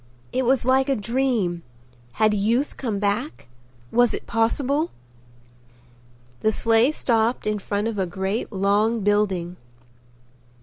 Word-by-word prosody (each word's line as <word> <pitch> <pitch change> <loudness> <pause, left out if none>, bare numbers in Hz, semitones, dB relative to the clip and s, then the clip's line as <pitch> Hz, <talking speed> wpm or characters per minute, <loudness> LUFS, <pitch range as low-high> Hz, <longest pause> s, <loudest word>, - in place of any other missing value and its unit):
It 260 0 0
was 260 0 +2
like 265 +1 +3
a 275 - +2
dream. 230 -6 -1 0.5
Had 215 -1 +2
youth 230 +7 0
come 225 -6 -3
back? 205 - -2 0.4
Was 245 0 +3
it - - -8
possible? 275 +7 0 1.5
The 220 - +2
sleigh 230 +4 +3
stopped 235 -4 0
in 210 0 -1
front 205 +2 -2
of 220 -3 -3
a 190 - 0
great 190 +6 -3
long 205 +3 +1
building. 190 -4 0
220 Hz, 125 wpm, -23 LUFS, 200-250 Hz, 1.5 s, like